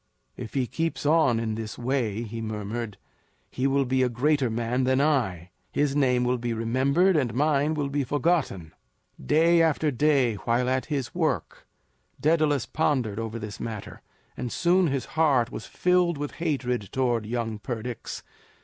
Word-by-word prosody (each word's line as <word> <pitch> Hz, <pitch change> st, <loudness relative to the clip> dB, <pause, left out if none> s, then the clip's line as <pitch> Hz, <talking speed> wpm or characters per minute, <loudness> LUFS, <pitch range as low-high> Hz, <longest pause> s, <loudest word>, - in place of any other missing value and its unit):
"If 110 Hz, -, -8 dB
he 130 Hz, -2 st, +2 dB
keeps 165 Hz, +4 st, -3 dB
on 145 Hz, -6 st, +4 dB
in 110 Hz, -1 st, -2 dB
this 110 Hz, 0 st, -5 dB
way," 120 Hz, -4 st, -1 dB
he 115 Hz, 0 st, -6 dB
murmured, 110 Hz, 0 st, -4 dB, 0.5 s
"he 130 Hz, +2 st, 0 dB
will 140 Hz, 0 st, +2 dB
be 130 Hz, +1 st, +1 dB
a 125 Hz, -, +3 dB
greater 135 Hz, +2 st, +1 dB
man 120 Hz, +3 st, -1 dB
than 130 Hz, +1 st, +2 dB
I; 110 Hz, -, 0 dB, 0.2 s
his 145 Hz, -1 st, 0 dB
name 125 Hz, -4 st, +3 dB
will 125 Hz, 0 st, +1 dB
be 120 Hz, 0 st, -2 dB
remembered, 135 Hz, +11 st, +2 dB
and 125 Hz, -7 st, 0 dB
mine 150 Hz, +2 st, +2 dB
will 145 Hz, -2 st, -1 dB
be 140 Hz, 0 st, -1 dB
forgotten." 140 Hz, -, 0 dB, 0.5 s
Day 165 Hz, +3 st, +4 dB
after 160 Hz, -2 st, +2 dB
day, 135 Hz, -4 st, +2 dB
while 120 Hz, +4 st, 0 dB
at 130 Hz, 0 st, 0 dB
his 140 Hz, -5 st, -3 dB
work, -, -, -2 dB, 0.5 s
Daedalus 155 Hz, -4 st, +2 dB
pondered 130 Hz, -9 st, 0 dB
over 115 Hz, 0 st, -4 dB
this 105 Hz, -2 st, -7 dB
matter, 110 Hz, -3 st, -6 dB, 0.3 s
and 125 Hz, -2 st, -4 dB
soon 175 Hz, +1 st, +3 dB
his 135 Hz, -4 st, -1 dB
heart 140 Hz, -7 st, +2 dB
was -, -, -7 dB
filled 180 Hz, -2 st, +2 dB
with 145 Hz, 0 st, -4 dB
hatred 125 Hz, -, -1 dB
towards 120 Hz, -4 st, 0 dB
young 115 Hz, -2 st, -3 dB
Perdix. 120 Hz, 0 st, -5 dB
130 Hz, 160 wpm, -26 LUFS, 115-150 Hz, 0.5 s, on